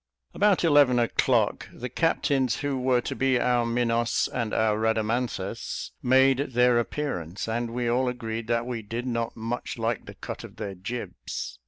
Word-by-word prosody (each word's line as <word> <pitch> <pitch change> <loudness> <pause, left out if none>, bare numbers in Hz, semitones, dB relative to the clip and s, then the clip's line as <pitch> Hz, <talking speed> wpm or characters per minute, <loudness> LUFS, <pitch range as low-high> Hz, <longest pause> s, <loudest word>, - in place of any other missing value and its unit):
About 205 -3 +3
eleven 145 -6 +5
o'clock, 120 -1 +1
the 125 - -6
captains 135 -3 +1
who 145 -1 -1
were 125 -1 +2
to - - -4
be 130 -2 +2
our 120 -1 +2
Minos 115 0 +1
and 115 -3 -1
our 110 -1 +2
Rhadamanthus, 110 +1 -1
made 130 +1 +4
their 125 0 +4
appearance, 100 - -3
and 115 +1 -1
we 120 +1 -2
all 125 +2 +2
agreed 115 -2 -4
that 120 0 +1
we 120 -2 -4
did 115 +4 -5
not 115 -2 -2
much 115 +3 -4
like 115 -1 -2
the - - -9
"cut - - -7
of - - -11
their 100 - -5
jibs." 95 - -6
120 Hz, 165 wpm, -26 LUFS, 115-125 Hz, -, eleven